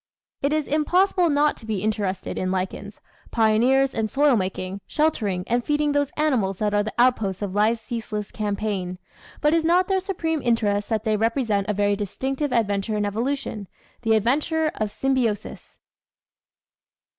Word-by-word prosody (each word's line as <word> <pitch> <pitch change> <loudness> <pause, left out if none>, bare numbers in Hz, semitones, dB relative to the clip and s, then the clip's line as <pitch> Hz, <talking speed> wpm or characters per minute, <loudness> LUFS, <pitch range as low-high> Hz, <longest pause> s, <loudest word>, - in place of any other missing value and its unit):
It 280 - +1
is 310 -1 0
impossible 350 +4 +2
not 295 0 +3
to 225 - -13
be 210 -3 -2
interested 205 -3 -2
in 185 - -1
lichens, 190 +2 -4 0.3
pioneers 240 +5 +3
in 225 -1 -1
soil 280 +3 +3
making, 190 -1 -3
sheltering 215 -13 0
and 240 +1 0
feeding 295 +1 +1
those 285 -1 +1
animals 245 -11 +1
that 210 0 -1
are 205 - +3
the 215 +1 -4
outposts 220 -6 +2
of 195 -2 -3
life's 220 +3 +2
ceaseless 215 -3 -5
campaign, 200 -3 -3 0.4
but 300 +1 +3
is 330 -1 +3
not 350 +3 +3
their 385 -1 +2
supreme 330 -5 -2
interest 210 -4 +1
that 220 -2 0
they 215 -2 +1
represent 225 -3 0
a - - +2
very 205 0 +2
distinctive 265 +8 -3
adventure 210 -2 0
in 205 - 0
evolution 220 -1 -3 0.3
the 225 -2 +3
adventure 300 +8 +1
of 215 -1 -2
symbiosis? 240 -4 -2
225 Hz, 155 wpm, -24 LUFS, 205-285 Hz, 0.4 s, not